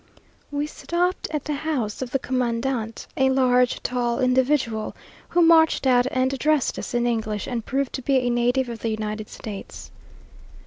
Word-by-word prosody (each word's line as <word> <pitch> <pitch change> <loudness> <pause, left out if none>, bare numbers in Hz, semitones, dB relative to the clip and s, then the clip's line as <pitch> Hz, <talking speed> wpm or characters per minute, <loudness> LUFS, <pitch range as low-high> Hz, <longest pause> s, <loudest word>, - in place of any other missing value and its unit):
We 290 0 -1
stopped 350 +4 -1
at 300 -2 -3
the 300 - -1
house 275 -8 -2
of 255 - -3
the 270 - +1
commandant, 245 -2 -2
a 265 0 +3
large, 250 -1 +2
tall 240 -1 -1
individual, 255 -3 +1 0.3
who 350 - +3
marched 325 -3 +5
out 250 -1 +4
and 260 +1 0
addressed 300 0 +1
us - - -5
in 240 0 +2
English, 220 -3 -1
and 235 -2 -3
proved 275 +1 -2
to 265 - -3
be 275 +2 +1
a 245 -1 +1
native 245 +2 +1
of 235 -1 -6
the 230 - -2
United 215 -1 -4
States. 205 -3 -8
255 Hz, 170 wpm, -24 LUFS, 235-275 Hz, 0.3 s, marched